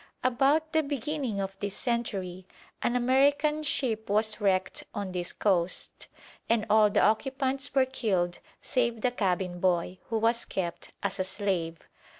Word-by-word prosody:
About 280 Hz, +6 st, +2 dB
the 315 Hz, -, +4 dB
beginning 280 Hz, -5 st, -3 dB
of 195 Hz, 0 st, -3 dB
this 200 Hz, -1 st, -3 dB
century 195 Hz, -7 st, -2 dB, 0.3 s
an 240 Hz, -, 0 dB
American 280 Hz, +5 st, +3 dB
ship 235 Hz, -8 st, 0 dB
was 215 Hz, +1 st, +1 dB
wrecked 190 Hz, -1 st, +1 dB
on 200 Hz, -2 st, -3 dB
this 180 Hz, -1 st, -3 dB
coast, 185 Hz, -3 st, 0 dB, 0.4 s
and 225 Hz, -1 st, +2 dB
all 215 Hz, -1 st, +6 dB
the -, -, +2 dB
occupants 265 Hz, +5 st, 0 dB
were 265 Hz, -1 st, +5 dB
killed 190 Hz, -9 st, -1 dB, 0.2 s
save 235 Hz, -3 st, 0 dB
the 250 Hz, -, +2 dB
cabin 185 Hz, -5 st, -1 dB
boy, 180 Hz, 0 st, 0 dB
who 225 Hz, -, 0 dB
was 230 Hz, +2 st, +2 dB
kept 175 Hz, -3 st, -4 dB
as 200 Hz, -1 st, -2 dB
a -, -, +2 dB
slave. 185 Hz, -4 st, -1 dB
215 Hz, 150 wpm, -28 LUFS, 190-260 Hz, 0.4 s, all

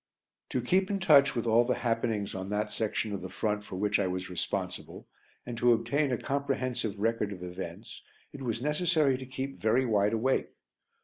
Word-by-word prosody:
To 125 Hz, -, -1 dB
keep 185 Hz, +9 st, +2 dB
in 200 Hz, -, 0 dB
touch 145 Hz, -8 st, +6 dB
with 120 Hz, -, -1 dB
all 115 Hz, +1 st, +5 dB
the 125 Hz, +1 st, 0 dB
happenings 115 Hz, -3 st, -1 dB
on 95 Hz, 0 st, -5 dB
that 105 Hz, +1 st, -1 dB
section 110 Hz, -1 st, -1 dB
of 100 Hz, -, -4 dB
the 95 Hz, -, -6 dB
front 105 Hz, +1 st, -1 dB
for 95 Hz, -, -8 dB
which 105 Hz, +2 st, +1 dB
I 100 Hz, -, +1 dB
was 90 Hz, 0 st, -4 dB
responsible, 90 Hz, -, -4 dB, 0.4 s
and 120 Hz, -, -5 dB
to 120 Hz, 0 st, +5 dB
obtain 140 Hz, +4 st, +1 dB
a 125 Hz, -, +1 dB
comprehensive 130 Hz, -6 st, -2 dB
record 110 Hz, -1 st, 0 dB
of 90 Hz, -2 st, -7 dB
events, 90 Hz, +3 st, -7 dB, 0.3 s
it 140 Hz, -, -9 dB
was 120 Hz, -2 st, -2 dB
necessary 150 Hz, -2 st, +2 dB
to 130 Hz, -, -7 dB
keep 135 Hz, +1 st, -5 dB
very 120 Hz, +4 st, +3 dB
wide 105 Hz, -2 st, +2 dB
awake. 125 Hz, +4 st, 0 dB
115 Hz, 190 wpm, -30 LUFS, 105-135 Hz, 0.4 s, touch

